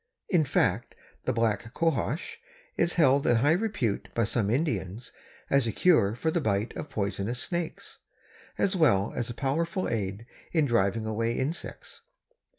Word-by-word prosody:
In 170 -5 +3
fact, - - 0 0.3
the - - +1
Black 115 0 -1
Cohosh 160 -1 -1 0.4
is 170 - +1
held 140 -4 +4
in 120 - +5
high 135 +7 +3
repute 175 - -1
by 115 - +2
some 105 -1 0
Indians 115 - -2 0.4
as 140 -4 +2
a - - 0
cure 115 - +3
for 160 +6 -1
the 170 - 0
bite 105 -2 -1
of 150 - -6
poisonous 100 +1 -2
snakes, 170 +2 -4 0.6
as 195 - +1
well 115 - +3
as 120 -1 -2
a 120 - -6
powerful 165 +8 -1
aid 105 -1 -3 0.3
in 160 -3 +3
driving 115 -3 +1
away 115 +2 -1
insects. 150 - -5
120 Hz, 155 wpm, -28 LUFS, 110-160 Hz, 0.6 s, in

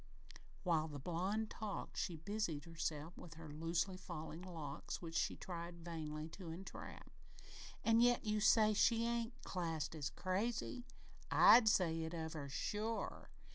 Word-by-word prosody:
While 165 -4 +2
the 145 -2 -6
blonde 185 +9 -1
talked 215 -2 -4
she 175 - -1
busied 165 -3 -2
herself 165 -1 -3
with 165 -3 -10
her 160 0 -9
loosely 165 +4 0
falling 160 -2 -6
locks, 160 -5 -5
which 165 -2 -7
she 165 - +1
tried 170 -1 -6
vainly 155 -2 -4
to 175 0 -8
entrap. 175 +4 -8 0.7
"An' 225 0 +5
yet 245 -1 +4
you 215 0 +1
say 215 0 +6
she 230 +2 +4
ain't 235 +1 -1
classed 165 -5 -2
as 150 -3 -2
crazy? 230 +6 -2 0.4
I'd 225 -2 +8
say 165 -5 +3
it 160 +1 -3
of 160 -1 -3
her, 145 -3 -5
sure! 210 +11 -2
170 Hz, 145 wpm, -39 LUFS, 160-210 Hz, 0.7 s, I'd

